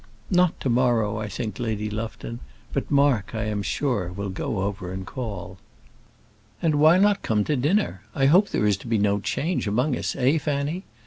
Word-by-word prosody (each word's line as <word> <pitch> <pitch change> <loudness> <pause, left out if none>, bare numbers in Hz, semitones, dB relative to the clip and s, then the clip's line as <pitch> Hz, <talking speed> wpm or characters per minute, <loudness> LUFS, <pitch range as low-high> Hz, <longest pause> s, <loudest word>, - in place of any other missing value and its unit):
"Not 180 -1 +3
to 135 - 0
morrow, 115 -3 +2
I 110 - -3
think, 105 0 -5
Lady 110 -3 -2
Lufton; 115 +2 -5 0.3
but 140 - -2
Mark, 140 -8 +2
I 110 - -1
am 105 -2 -2
sure, 100 -5 -1
will 100 +1 -4
go 100 +1 -3
over 100 -2 -3
and 95 0 -5
call." 95 -6 -6 1.0
"And 160 -2 +1
why 160 +4 +7
not 200 +1 +3
come 105 -2 +1
to 150 - 0
dinner? 155 +11 +1
I 135 -3 +2
hope 180 +9 +5
there - - 0
is 105 -2 +3
to 100 - -12
be 115 -1 +1
no 100 0 +2
change 140 - -1
among 125 +7 +1
us, - - -3
eh, 135 +4 +2
Fanny?" 150 +5 -2
115 Hz, 190 wpm, -24 LUFS, 105-145 Hz, 1.0 s, why